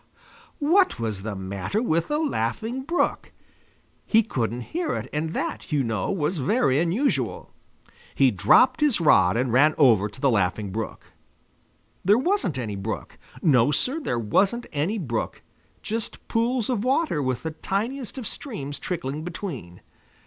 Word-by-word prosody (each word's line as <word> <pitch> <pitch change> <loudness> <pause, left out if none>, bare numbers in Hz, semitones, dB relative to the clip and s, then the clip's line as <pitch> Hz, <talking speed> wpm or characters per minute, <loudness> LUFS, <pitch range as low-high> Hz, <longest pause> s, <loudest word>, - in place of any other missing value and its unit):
What 345 - +3
was 110 -4 -3
the 105 0 -4
matter 95 - -3
with 165 -8 0
the 295 - 0
Laughing 230 - -1
Brook? 335 +6 -1 0.8
He 225 0 +5
couldn't 120 - -2
hear 340 0 -1
it - - -4
and 160 +2 -2
that, - - -4
you 145 -3 +2
know, 110 -5 -2
was 165 0 -1
very 140 - +2
unusual. 165 - 0 0.6
He 135 -2 +4
dropped 110 - +4
his 290 -9 +3
rod 95 - +4
and 125 -1 0
ran 150 +4 +5
over 110 -8 +5
to 100 - -14
the 135 -1 +3
Laughing 100 -1 0
Brook. 110 +3 -5 1.0
There 205 +4 +5
wasn't 265 - 0
any 110 -5 -3
brook. 100 +3 -5 0.2
No, 135 -5 +5
sir, 255 - 0
there 245 - -2
wasn't 195 - +1
any 160 +10 0
brook; 120 - -3 0.4
just 225 +1 -4
pools 230 0 0
of 235 -5 -1
water 265 - +1
with 130 -2 -2
the 160 - -3
tiniest 230 - -3
of 255 - -5
streams 145 - -5
trickling 150 -3 -4
between. 155 - -7
150 Hz, 150 wpm, -25 LUFS, -, 1.0 s, He